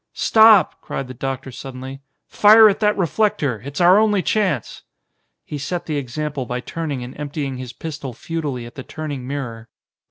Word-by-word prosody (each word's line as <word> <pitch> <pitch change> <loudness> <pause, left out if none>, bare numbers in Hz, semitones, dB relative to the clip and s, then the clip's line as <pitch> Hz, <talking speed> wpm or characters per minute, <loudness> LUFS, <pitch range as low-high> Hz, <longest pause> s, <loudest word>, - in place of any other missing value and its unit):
"Stop!" 220 -5 +5
cried 135 - -5
the 130 - -8
doctor 135 +1 -5
suddenly. 130 +2 -8 0.2
"Fire 215 +1 +7
at 200 -1 +1
that 210 -1 +2
reflector! 165 - 0
It's 140 +1 -6
our 180 +3 +6
only 210 -3 +2
chance!" 185 - -1 0.6
He 145 - -6
set 170 +5 -4
the 155 -2 -2
example 140 0 -4
by 125 0 -3
turning 145 0 -4
and 125 +1 -9
emptying 145 -2 -4
his 125 -1 -7
pistol 145 0 -7
futilely 145 -2 -4
at 120 - -11
the 135 - -8
turning 145 -3 -6
mirror. 120 -5 -6
145 Hz, 165 wpm, -20 LUFS, 130-175 Hz, 0.6 s, Fire